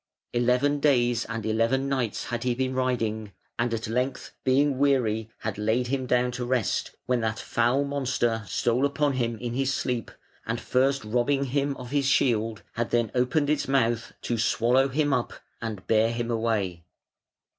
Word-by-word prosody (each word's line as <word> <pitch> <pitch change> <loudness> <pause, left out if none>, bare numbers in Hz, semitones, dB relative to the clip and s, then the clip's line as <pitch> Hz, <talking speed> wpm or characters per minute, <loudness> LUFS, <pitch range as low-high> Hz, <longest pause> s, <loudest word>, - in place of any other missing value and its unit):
Eleven 125 +4 +2
days 120 -5 +2
and 115 -1 -5
eleven 115 +5 +1
nights 130 -6 -1
had 120 -1 -4
he 125 -1 +1
been 130 +1 -1
riding, 115 -5 -1 0.3
and 120 0 +1
at 115 0 -2
length 125 +4 -2
being 135 +1 +2
weary 115 -6 +2
had 105 -2 -3
laid 110 +4 +1
him 130 -1 -1
down 125 0 +2
to 125 0 -4
rest, 125 -3 0 0.2
when 125 -2 +1
that 110 -1 -1
foul 120 +4 +1
monster 130 -5 -1
stole 120 +7 +1
upon 145 0 +1
him 120 -3 -1
in 120 +1 -4
his 135 +1 0
sleep, 125 -4 -2 0.3
and 115 +1 -2
first 135 +3 +1
robbing 125 +5 +1
him 140 +1 -1
of 125 -1 -9
his 140 -2 +1
shield, 115 -5 +1
had 115 0 -2
then 120 -3 +1
opened 125 +4 +1
its 150 0 0
mouth 120 -4 +1
to 120 -2 -1
swallow 120 +4 +3
him 145 +1 +1
up 125 -3 -1 0.3
and 110 -4 -5
bear 110 +1 +3
him 120 0 -2
away. 110 -7 -1
125 Hz, 170 wpm, -26 LUFS, 115-135 Hz, 0.3 s, swallow